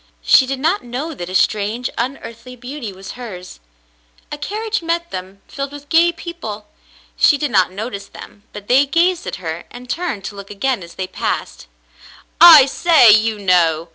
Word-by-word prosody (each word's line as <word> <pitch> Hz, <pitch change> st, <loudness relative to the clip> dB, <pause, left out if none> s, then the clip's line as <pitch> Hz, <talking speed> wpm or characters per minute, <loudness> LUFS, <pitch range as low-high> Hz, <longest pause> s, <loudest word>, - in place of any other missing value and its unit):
She 260 Hz, -, +5 dB
did 270 Hz, 0 st, -3 dB
not 330 Hz, +8 st, 0 dB
know 255 Hz, +7 st, -5 dB
that 175 Hz, -, -7 dB
a 185 Hz, -, -5 dB
strange, 215 Hz, +5 st, 0 dB
unearthly 250 Hz, -1 st, -6 dB
beauty 250 Hz, -2 st, -7 dB
was 190 Hz, 0 st, -10 dB
hers. 195 Hz, -, -10 dB, 0.7 s
A 295 Hz, -, -5 dB
carriage 435 Hz, +7 st, -3 dB
met 340 Hz, +1 st, -3 dB
them 190 Hz, +2 st, -8 dB
filled 275 Hz, 0 st, -6 dB
with 290 Hz, 0 st, -12 dB
gay 340 Hz, +1 st, +4 dB
people. 325 Hz, -, -8 dB, 0.5 s
She 290 Hz, -, +4 dB
did 295 Hz, 0 st, -3 dB
not 185 Hz, -1 st, +2 dB
notice 200 Hz, 0 st, -6 dB
them, 205 Hz, -, -13 dB
but 205 Hz, -1 st, -10 dB
they 270 Hz, +3 st, +4 dB
gazed 345 Hz, +4 st, +1 dB
at -, -, -4 dB
her 165 Hz, -1 st, -6 dB
and 245 Hz, +1 st, -12 dB
turned 325 Hz, -, -4 dB
to 205 Hz, -, -7 dB
look 200 Hz, 0 st, -10 dB
again 240 Hz, +3 st, -2 dB
as 170 Hz, -1 st, -12 dB
they 190 Hz, -, -4 dB
passed. 185 Hz, -, -4 dB, 0.7 s
"I 325 Hz, -5 st, +10 dB
say, 275 Hz, -4 st, +5 dB
you 215 Hz, +1 st, +3 dB
know 170 Hz, -4 st, +1 dB
245 Hz, 175 wpm, -18 LUFS, 200-295 Hz, 0.7 s, I